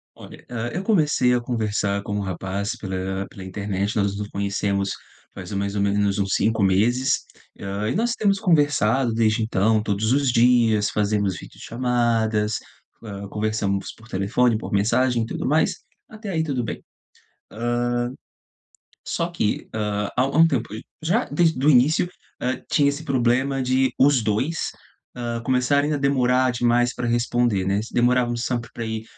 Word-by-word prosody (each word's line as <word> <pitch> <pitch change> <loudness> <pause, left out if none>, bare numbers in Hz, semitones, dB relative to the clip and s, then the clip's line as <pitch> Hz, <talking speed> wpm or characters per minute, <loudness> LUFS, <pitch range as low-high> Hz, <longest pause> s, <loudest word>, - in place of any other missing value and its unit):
Olha, - - -13
ah, 120 -1 -3
eu 180 - -3
comecei 150 - +3
a 125 - +2
conversar 105 -4 -1
com 100 - -4
um - - -1
rapaz 100 +3 -3
pela 95 -1 -4
pela 95 - -10
internet. 100 +1 -3
Nós 100 -1 0
nos 105 0 -4
conhecemos 100 -1 -1 0.4
faz 95 0 -8
mais 100 0 -2
ou 100 - 0
menos 100 0 +1
uns 95 -1 0
5 110 0 +1
meses. 115 +8 +2 0.4
Ah, 100 +2 -3
e - - -1
nós 235 +4 +1
temos 200 -2 +1
conversado 145 - +2
desde 110 0 +2
então, 110 0 +2
todos 105 +1 -1
os 135 -1 +2
dias 115 -4 +4
fazemos 100 -3 0
vídeochamadas. 115 -3 -1 0.5
Ah, 100 -2 -7
conversamos 105 -2 -2
por 110 - -18
telefone, 110 +5 +1
por 110 - -7
mensagem 115 +4 +2
e - - -3
tudo 115 - -4
mais. 155 +3 +2 0.3
Até 215 -1 -8
aí 160 -4 0
tudo 135 -6 -2
bem. 110 - -6 0.7
Ah. 120 +2 -2 1.3
Só 170 - -1
que, 110 -11 -2
ah, 105 -2 -2
há 125 - +3
há - - +2
um 160 +4 +5
tempo, 125 -6 -1 0.3
já 190 +10 +1
desde 160 -6 +1
o 150 - +6
início. 150 +6 +4 0.3
Hã, 125 +1 -2
tinha 145 -1 +4
esse 145 +3 -3
problema 130 0 +1
de 130 0 +1
os 135 -1 +5
2. 125 +10 -1 0.4
Ah, 120 -1 -3
começarem 140 +4 +2
a - - 0
demorar 130 -2 +2
demais 120 +1 +2
para 125 - -3
responder, 120 -4 +1
né. 100 +1 +1
Se 115 - -11
demorávamos 120 -1 +2
sempre 120 -2 -2
para 115 - -5
aí 110 -1 -4
115 Hz, 160 wpm, -23 LUFS, 105-130 Hz, 1.3 s, o